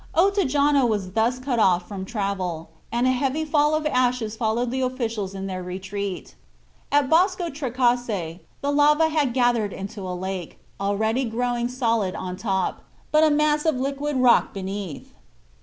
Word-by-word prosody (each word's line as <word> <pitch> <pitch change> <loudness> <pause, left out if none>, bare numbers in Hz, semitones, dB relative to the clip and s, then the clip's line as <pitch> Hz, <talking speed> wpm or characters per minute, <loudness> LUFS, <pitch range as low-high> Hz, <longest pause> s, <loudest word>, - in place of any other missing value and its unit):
Ottajano 295 -8 +3
was 205 -5 -2
thus 225 +5 +1
cut 255 -2 -2
off 180 -4 +3
from 195 -2 -6
travel, 190 -6 -3 0.2
and 240 +1 +1
a 255 - +4
heavy 275 +4 0
fall 300 0 +2
of 310 0 -2
ashes 250 -6 +1
followed 235 +2 0
the 260 +1 -1
officials 230 -6 -2
in 195 0 -5
their 185 -1 -4
retreat. 190 - -5 0.6
At 285 -1 +3
Bosco 355 +2 +2
Trecase 245 - -1 0.2
the 285 - 0
lava 300 +2 +4
had 300 -5 +1
gathered 240 -4 +1
into 200 +2 -7
a 180 -1 -4
lake, 185 -2 -5 0.2
already 220 +5 0
growing 240 +1 -1
solid 230 -6 0
on 180 -1 -5
top, 190 -2 -1 0.3
but 305 +1 +5
a 315 - +5
mass 300 0 +2
of 315 -3 +2
liquid 280 +3 -2
rock 250 -4 +4
beneath. 195 -4 -6
240 Hz, 155 wpm, -24 LUFS, 195-280 Hz, 0.6 s, but